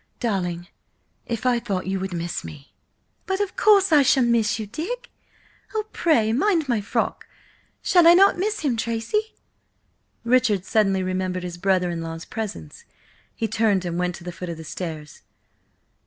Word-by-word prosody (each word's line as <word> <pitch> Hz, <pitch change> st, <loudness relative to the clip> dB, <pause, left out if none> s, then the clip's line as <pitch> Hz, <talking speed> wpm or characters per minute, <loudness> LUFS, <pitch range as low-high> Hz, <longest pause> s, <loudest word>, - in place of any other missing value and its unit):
"Darling, 180 Hz, -6 st, -2 dB, 0.6 s
if 230 Hz, 0 st, -4 dB
I 245 Hz, -1 st, +3 dB
thought 200 Hz, -6 st, -3 dB
you 190 Hz, +1 st, -2 dB
would 190 Hz, 0 st, -4 dB
miss 175 Hz, 0 st, -4 dB
me—" 145 Hz, -2 st, -11 dB, 0.5 s
"But 385 Hz, 0 st, -1 dB
of 405 Hz, -2 st, -2 dB
course 400 Hz, -3 st, +4 dB
I 300 Hz, -2 st, +7 dB
shall 265 Hz, -1 st, +4 dB
miss 235 Hz, -3 st, +2 dB
you, 220 Hz, -, -4 dB
Dick–oh, 430 Hz, -, -7 dB
pray, 225 Hz, -10 st, +2 dB
mind 330 Hz, -, +2 dB
my 235 Hz, -4 st, +1 dB
frock! 200 Hz, -, -2 dB, 0.6 s
Shall 350 Hz, -2 st, +5 dB
I 340 Hz, -, +9 dB
not 390 Hz, +2 st, +6 dB
miss 425 Hz, +3 st, -1 dB
him, 280 Hz, -6 st, 0 dB
Tracy?" 230 Hz, -, -2 dB, 0.9 s
Richard 235 Hz, -6 st, +2 dB
suddenly 195 Hz, -4 st, +2 dB
remembered 185 Hz, 0 st, -2 dB
his 175 Hz, -1 st, -6 dB
brother 185 Hz, -2 st, +1 dB
in 170 Hz, -1 st, -4 dB
law's 165 Hz, 0 st, -6 dB
presence. 205 Hz, -, -6 dB, 0.5 s
He 225 Hz, -, -1 dB
turned 215 Hz, -3 st, +1 dB
and 175 Hz, 0 st, -2 dB
went 180 Hz, -1 st, -1 dB
to -, -, -12 dB
the 175 Hz, -, -5 dB
foot 180 Hz, +1 st, -7 dB
of 170 Hz, -, -5 dB
the 160 Hz, -, -8 dB
stairs. 155 Hz, -3 st, -7 dB
215 Hz, 165 wpm, -23 LUFS, 180-275 Hz, 0.9 s, I